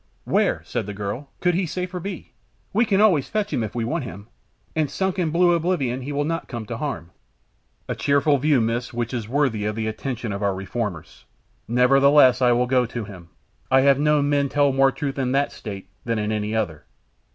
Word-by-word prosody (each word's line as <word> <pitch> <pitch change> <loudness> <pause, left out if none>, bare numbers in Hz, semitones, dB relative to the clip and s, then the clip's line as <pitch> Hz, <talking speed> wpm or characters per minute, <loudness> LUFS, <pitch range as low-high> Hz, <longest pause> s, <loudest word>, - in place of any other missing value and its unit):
"Where," - - +1
said - - -3
the 105 - -6
girl, 105 +8 -5
"could 180 -1 +2
he 180 +1 0
safer 180 +2 -4
be? 190 0 -7 0.4
We 225 +4 +3
can 200 -2 +2
always 185 -10 +4
fetch 215 -1 -2
him 115 - 0
if 110 +1 -6
we 115 -2 -1
want 155 +5 -2
him, 100 -4 -8 0.5
and 155 -3 +1
sunk 190 0 -1
in 170 -3 +1
blue 175 +2 +4
oblivion 160 -7 0
he 135 +3 -5
will 145 0 0
not 165 +2 -3
come 120 -3 -6
to 115 +2 -5
harm." 115 - -4 0.8
"A - - -1
cheerful 140 0 +2
view, 145 -1 +3
Miss, 115 +2 -2
which 120 +1 -2
is 115 -3 -4
worthy 130 -6 +1
of 105 0 -2
the 110 0 -2
attention 115 0 -4
of 100 - -5
our 100 -2 +1
reformers. 95 -3 -5 0.4
Nevertheless, 130 +2 +5
I 125 -1 +5
will 120 +1 +3
go 125 -1 +2
to 120 -1 -5
him. 90 -5 -11 0.4
I 130 0 +5
have 140 0 +4
known 150 -1 +3
men 140 -1 +1
tell 145 0 +3
more 135 0 +4
truth 140 -1 -4
in 130 -1 0
that 140 +1 +1
state 100 -4 -8 0.2
than 115 -1 -1
in 105 0 -1
any 105 0 -2
other." 85 -9 -2
130 Hz, 210 wpm, -23 LUFS, 110-150 Hz, 0.8 s, Nevertheless